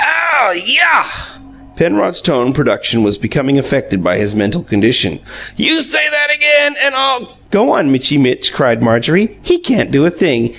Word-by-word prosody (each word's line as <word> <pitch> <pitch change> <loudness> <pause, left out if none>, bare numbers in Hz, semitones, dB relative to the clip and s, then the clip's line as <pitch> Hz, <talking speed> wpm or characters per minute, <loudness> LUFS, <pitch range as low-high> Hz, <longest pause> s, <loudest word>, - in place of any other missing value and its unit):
"Ow 290 - +1
YAH!" 290 - +1 0.4
Penrod's - - -1
tone 125 +2 0
production 125 -5 0
was 100 -1 0
becoming 140 +5 -1
affected 130 -9 -3
by 90 +1 -1
his 105 0 -2
mental 105 +11 -2
condition. 110 +4 +1 0.4
"You 320 +1 +2
say 295 +1 0
that 295 0 +1
again, 295 -1 +3
and 275 -1 +1
I'll 265 -2 -2
" - - -33
"Go 215 +4 +1
on, 135 - +1
Mitchy 135 +2 +1
Mitch," 130 -3 +1
cried 115 -1 -1
Marjorie. 150 - 0
"He 355 -1 0
can't 265 - -2
do 140 +1 +2
a 170 - +3
thing. 145 -10 -1
150 Hz, 170 wpm, -12 LUFS, -, 0.4 s, again